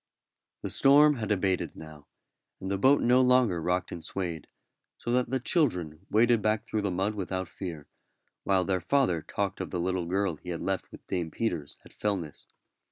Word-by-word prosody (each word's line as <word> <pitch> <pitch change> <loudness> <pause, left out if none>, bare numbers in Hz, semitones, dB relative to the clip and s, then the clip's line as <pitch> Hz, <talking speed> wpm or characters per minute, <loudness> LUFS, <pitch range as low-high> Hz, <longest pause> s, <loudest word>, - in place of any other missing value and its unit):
The - - -2
storm 145 +1 +6
had 110 -2 -3
abated 95 -2 0
now, 75 -2 -12 0.5
and 95 - -5
the 100 - -1
boat 135 +6 +4
no 125 +2 +5
longer 125 -9 +3
rocked 90 +2 -1
and 85 - -7
swayed, 85 -5 -4 0.5
so 120 - -4
that 125 0 +1
the 130 +1 0
children 90 - -1
waded 115 +1 +4
back 110 +1 0
through 110 -2 -2
the 100 - -1
mud 95 +4 -1
without 95 -2 -3
fear, 85 -5 -7 0.6
while 95 -2 +2
their 95 -2 0
father 90 - +1
talked 100 +5 -3
of 95 - -4
the 90 - -3
little 90 0 -1
girl 95 -2 0
he 90 - -11
had 85 -2 -4
left 95 -1 -2
with - - -13
Dame 90 -3 -2
Peters 85 -6 -3
at - - -16
Fellness. 95 -8 -3
95 Hz, 185 wpm, -28 LUFS, 85-115 Hz, 0.6 s, storm